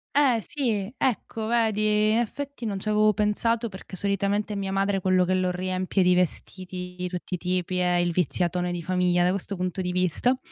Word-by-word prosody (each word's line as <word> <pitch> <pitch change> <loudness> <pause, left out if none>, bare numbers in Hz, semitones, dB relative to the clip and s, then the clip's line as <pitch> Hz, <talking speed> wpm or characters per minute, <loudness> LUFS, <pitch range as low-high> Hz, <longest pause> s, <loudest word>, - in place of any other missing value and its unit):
Eh, 275 -5 +4
sì, 220 - -1
ecco 230 -3 -1
vedi, 215 -2 +2
effetti 240 +4 -2
non 200 -3 -2
c'avevo 215 +1 +2
pensato 225 +3 +1
perché 190 -1 -10
solitamente 200 +2 0
è - - -4
mia 195 -1 -3
madre 195 0 +1
quello 185 -1 +3
che 185 - 0
lo 185 -1 +1
riempie 185 +1 0
di 180 0 +4
vestiti 180 +1 -2
di 180 - -2
tutti 180 +1 -6
i - - +1
tipi, 180 0 -1
è 180 -1 +2
il 175 0 +2
viziatone 180 +1 0
di 175 -1 -4
famiglia 180 0 +2
da 180 - +3
questo 200 +1 -3
punto 185 0 -2
di 180 0 -2
vista, 185 - +1
190 Hz, 190 wpm, -26 LUFS, 180-215 Hz, -, Eh